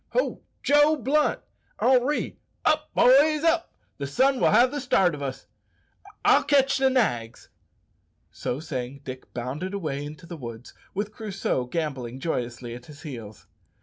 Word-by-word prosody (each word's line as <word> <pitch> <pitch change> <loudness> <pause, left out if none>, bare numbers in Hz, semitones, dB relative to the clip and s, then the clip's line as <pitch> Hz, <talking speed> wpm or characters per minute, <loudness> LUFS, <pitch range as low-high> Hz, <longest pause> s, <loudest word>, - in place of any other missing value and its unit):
"Ho! - - 0 0.2
Joe 295 +2 +5
Blunt! 295 +3 +1 0.4
Henri! 260 +3 +2 0.3
Up, - - +2
boys, 295 +4 +5
up! 330 +1 +2 0.3
The 140 - -3
sun 265 - +2
will - - +4
have 240 +4 +5
the 290 -1 -3
start 190 - +3
o' 145 - -6
us. 135 -2 -5 0.8
I'll - - +6
catch 275 -1 +3
the 265 0 +4
nags." 120 - -1 0.8
So 125 - -3
saying 135 -3 -5
Dick 130 -1 -8
bounded 140 +11 -4
away 150 -7 -3
into 155 +4 -9
the 170 0 -8
woods, 120 -3 -9 0.2
with 205 +2 -2
Crusoe 195 - -2
gambolling 130 -5 -3
joyously 120 -5 -3
at 125 +1 -10
his 150 +1 -13
heels. 115 -9 -8
165 Hz, 150 wpm, -26 LUFS, -, 0.8 s, I'll